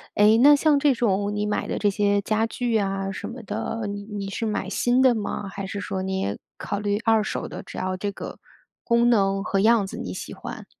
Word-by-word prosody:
哎， 210 +2 +6
那 290 +2 +8
像 295 0 +3
这 280 -1 +4
种 205 -3 0
你 210 0 -1
买 210 - -1
的 - - -2
这 205 - +3
些 205 0 +1
家 215 +2 +1
具 235 0 -1
啊 195 -1 -1
什 - - -6
么 240 +1 -8
的， 220 +1 -3
你 205 0 -5
你 205 -1 -5
是 225 +3 -3
买 210 -3 -2
新 245 +5 +2
的 260 -2 +5
吗， 205 -1 -3
还 195 0 -6
是 200 +1 -5
说 190 -1 -3
你 190 0 -2
也 100 - -2 0.2
考 200 - -3
虑 205 0 0
二 225 -2 +3
手 - - -3
的？ - - -8
只 - - -10
要 185 0 -2
这 200 +2 -2
个 - - -8 0.4
功 235 0 +3
能 195 -3 +2
和 200 -2 0
样 215 -1 +4
子 - - -7
你 90 - -5
喜 - - -7
欢。 - - -8
205 Hz, 250 characters per minute, -24 LUFS, 195-230 Hz, 0.4 s, 那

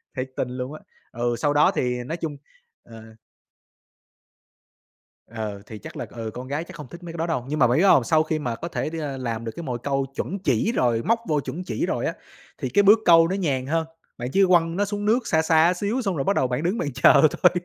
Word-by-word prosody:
Thiệt 130 0 -4
tình 125 - -2
luôn 130 +3 -4
á. 155 - -9 0.3
Ừ, 120 0 -1
sau 145 -1 +1
đó 145 - +4
thì 125 -1 -1
nói 160 +7 -4
chung 155 -4 -5 0.5
ờ. 110 -1 -14 2.1
Ờ, 110 -3 -6
thì 110 - -9
chắc - - -10
là, - - -4
ừ, 115 -2 -6
con 125 +1 -7
gái 145 +4 -2
chắc - - -12
không 150 -4 -9
thích 170 +6 -12
mấy 165 -1 -8
cái - - -8
đó 165 - -1
đâu, 130 -7 -2
nhưng 150 +1 -3
mà 120 - +6
bạn 125 - +2
biết 170 - +3
không? 165 -10 +6
Sau 155 +5 +3
khi 155 0 -2
mà 120 -6 -3
có 170 - -6
thể 165 - -3
đưa 150 -4 -4
làm 115 -2 -4
được 115 - -3
cái 170 - -6
mồi 125 -4 -3
câu 135 +1 -1
chuẩn 195 - -3
chỉ 145 - +1
rồi 120 - +1
móc 230 0 +2
vô 150 -1 +1
chuẩn 175 +5 -5
chỉ 115 -10 -2
rồi - - -2
á, - - -1 0.4
thì 130 - -3
cái 205 +9 +3
bước 210 +3 +7
câu 165 -1 +7
nó 185 - -1
nhàn 140 -9 -1
hơn, 160 +3 0 0.3
bạn 125 +1 -4
chỉ 195 - +5
quăng 170 -2 +3
nó 205 +2 +1
xuống 205 0 -4
nước 230 +3 +2
xa 160 - +3
xa 160 +2 +4
xíu, 205 +8 -2
xong 195 -6 -1
rồi 135 - -1
bắt 200 - +1
đầu 130 - +2
bạn 125 +5 -2
đứng 185 +6 0
bạn 145 - -2
chờ - - +6
thôi 165 +3 +4
150 Hz, 255 wpm, -24 LUFS, 125-175 Hz, 2.1 s, bước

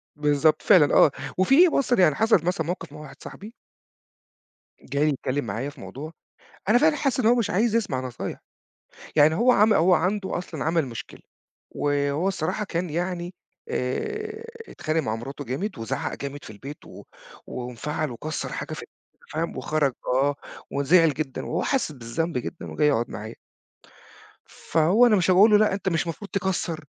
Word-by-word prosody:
بالضبط 150 +1 +2
فعلًا 170 -8 +5
آه، 150 - +6 0.3
وفي 270 - +6
بُص 275 -4 0
يعني 180 - +4
حصل 220 -5 +3
مثلًا 170 -3 -1
موقف 170 -3 -5
مع 150 - -10
واحد 150 -3 -11
صاحبي 210 +4 -10 1.3
جاي 145 +2 0
يتكلم 140 -1 -2
معايا 115 +7 -3
في 145 - -14
موضوع 150 +5 -8 0.6
أنا 230 - +6
فعلًا 305 +4 +4
حاسس 275 -3 0
إن 245 - +1
هو 235 +2 +5
مش 235 -4 0
عايز 220 +4 +1
يسمع 205 - 0
نصايح، 125 -2 -6 0.8
يعني 155 +1 +5
هو 245 +8 +4
عم 215 -1 +5
هو 180 0 +4
عنده 190 +3 0
أصلًا 175 - -5
عمل 160 -1 +1
مشكلة 115 -4 -9 0.5
و - - -8 0.3
وهو 165 +6 0
الصراحة 195 +3 -2
كان 175 -2 -3
يعني 175 +2 -3 0.4
آآ، 430 - -3 0.3
اتخانق 155 +1 -1
مع 110 -6 -2
مراته 135 +5 -7
جامد، 180 - -3
وزعّق 115 - -3
جامد 140 +1 -7
في - - -10
البيت 135 +8 -10
و - - -12 0.4
وانفعل 125 +4 -4
وكسّر 155 +6 -4
حاجة - - -5
في - - -6
البيت - - -17 0.4
فاهم 165 +2 -2
وخرج 150 -4 0
آه، 135 +3 +2 0.4
وزعل 155 +3 +4
جدًا 145 -2 -4
وهو 165 - -2
حاسس 265 - 0
بالذنب 135 +5 -3
جدًا 125 +7 -6
وجاي 150 - +2
يقعد 120 -5 +1
معايا. 110 +2 -7 1.1
فهو 170 +9 +2
أنا 230 -3 +5
مش 185 -2 +1
هاقول 200 +4 +6
له: 210 - +7
"لأ 210 -2 +3
أنت 195 -1 -1
مش 170 -1 -1
مفروض 170 +5 -6
تكسّر 180 -5 -2
160 Hz, 170 wpm, -25 LUFS, 140-195 Hz, 1.3 s, له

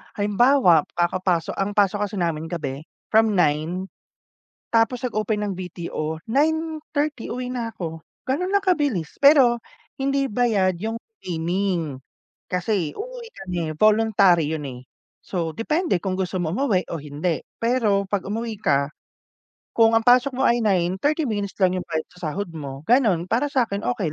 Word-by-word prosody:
Halimbawa, 205 - +4
kakapaso 175 -1 0
ang 200 +1 -2
pasok 205 0 +2
kasi 205 - -8
namin 165 -3 -1
sa 175 - -4
gabi 145 -1 -5 0.2
from 220 -1 +4
9, 165 +2 +1 0.9
tapos 230 +2 +2
nag-open 215 -1 -1
ng 195 - -2
VTO, 165 -3 -5
9:30 305 0 -1
uwi 250 0 -4
na 235 -3 -3
ako. 165 -4 -6 0.2
Gano'n 360 +9 0
lang 400 - +4
kabilis. 290 - 0
Pero 270 -5 +7 0.4
hindi 275 0 0
bayad 205 -6 +1
yung 225 +5 -4 0.2
training, 175 -3 -1 0.5
kasi 180 -3 -1
uuwi - - -7
kami 180 -2 -4 0.2
voluntary 200 -7 +4
'yun, 150 -3 -4
eh. 125 -1 -8 0.4
So, 170 -4 -2
depende 305 - 0
kung 185 +2 -3
gusto 185 0 -2
mo 165 -1 -1
umuwi 220 -7 +1
o 165 -4 -5
hindi. 150 +3 -2 0.2
Pero 220 -5 +1
'pag 195 -1 -1
umuwi 220 -1 -4
ka, 140 -5 +1 0.8
kung 225 0 +4
ang 225 - +2
pasok 250 +2 +4
mo 265 - +1
ay 240 0 +3
9, 190 -4 +1
30 305 +4 +1
minutes 205 -5 -3
lang 185 -2 +3
yung - - -9
bayad 160 -1 -2
sa 180 -3 -5
sahod 190 +4 -4
mo, 140 -2 -7
gano'n. 220 -8 +3
Para 235 +10 0
sa'kin 230 -7 0 0.2
okey 165 -7 -2
200 Hz, 155 wpm, -23 LUFS, 170-240 Hz, 0.9 s, Pero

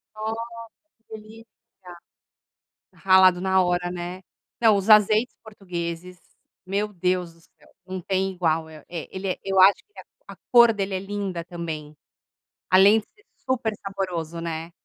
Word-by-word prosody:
Nossa, 220 +1 -4 0.7
que 220 - -10
delícia. 220 +2 -15 1.5
Ralado 185 -1 +5
na 190 0 +2
hora, 175 0 -1
né. 180 +1 -6 0.4
Não, 220 -3 +5
os 200 +2 -3
azeites 215 +3 +5
portugueses, 180 -4 -7 0.5
meu 205 +2 -2
Deus 180 -1 -1
do 165 - -24
céu, - - -26 0.2
não 185 0 -5
tem 190 +1 -1
igual. 165 -3 -1
El 155 -1 -13
é, 170 -3 -7
ele 190 0 -4
é 185 - -2
eu 195 -1 +2
acho 195 +2 +8
que 415 - -24
a - - -10 0.3
a - - -14 0.2
cor 235 -1 +7
dele 195 -2 -3
é 185 - -2
linda 195 -4 -5
também, 160 -4 -7 0.8
além 195 +4 +6
de 215 - -8
ser 420 - -27 0.2
super 240 -4 0
saboroso, 180 -5 -5
né. 165 0 -5
190 Hz, 155 wpm, -24 LUFS, 175-205 Hz, 1.5 s, acho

